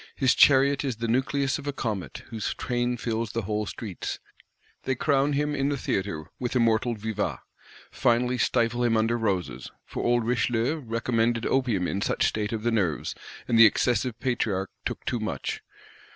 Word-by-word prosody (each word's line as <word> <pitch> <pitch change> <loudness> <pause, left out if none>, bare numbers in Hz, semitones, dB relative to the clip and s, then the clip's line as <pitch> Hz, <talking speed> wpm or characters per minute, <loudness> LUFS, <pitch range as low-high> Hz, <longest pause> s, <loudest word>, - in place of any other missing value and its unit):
"His 130 -2 +3
chariot 140 0 +5
is 130 -4 -1
the 115 +1 -3
nucleus 135 +3 +1
of 145 - -9
a - - +1
comet; 110 -8 -4
whose 110 -3 -3
train 120 0 -1
fills 115 -2 -2
whole 105 -1 -2
streets:" 100 -5 -5 0.6
they 135 - -1
crown 140 +1 +2
him 150 +1 0
in 140 -1 0
the 145 - -1
theatre, 95 -10 -2
with 125 +1 -3
immortal 115 0 +2
vivats; 105 -1 -3 0.5
"finally 125 +1 +1
stifle 120 0 +1
him 115 -2 +3
under 115 +2 +2
roses,"—for 95 - -3
old 120 -1 +2
Richelieu 120 +3 +1
recommended 115 -2 0
opium 120 -9 +1
in 100 - -2
such - - +1
state 105 -1 -2
of 110 -2 -3
the 120 - +1
nerves, 95 -9 0 0.3
and 115 -1 +3
the 115 - +11
excessive 120 +2 0
Patriarch 105 -6 -1 0.2
took - - -7
too 120 - -1
much. 110 - -3
115 Hz, 165 wpm, -26 LUFS, 110-125 Hz, 0.6 s, the